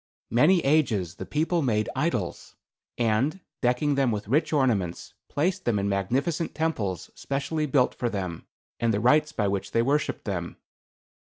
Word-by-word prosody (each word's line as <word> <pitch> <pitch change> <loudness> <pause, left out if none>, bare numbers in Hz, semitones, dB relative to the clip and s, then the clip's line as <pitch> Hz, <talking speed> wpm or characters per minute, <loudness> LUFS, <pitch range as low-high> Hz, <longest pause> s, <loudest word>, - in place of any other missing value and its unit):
"Many 155 +10 +5
ages 115 - +2
the - - -7
people 165 +3 +1
made 110 -6 +1
idols, 130 - -2 0.4
and, 120 - +1 0.2
decking 125 +4 +2
them 135 -2 +2
with 105 -2 -3
rich 145 +8 +2
ornaments, 115 - 0 0.2
placed 180 +6 -1
them 115 -3 +2
in 100 0 0
magnificent 130 - -1
temples 115 - -2
specially 140 +3 -2
built 130 -2 +3
for 120 - -2
them 90 -6 -5 0.3
and 115 -1 +2
the 100 - +1
rites 150 +6 +4
by 105 -8 0
which 100 0 -2
they 115 - +3
worshipped 145 +4 0
them. 90 -5 -4
125 Hz, 155 wpm, -26 LUFS, 105-150 Hz, 0.4 s, Many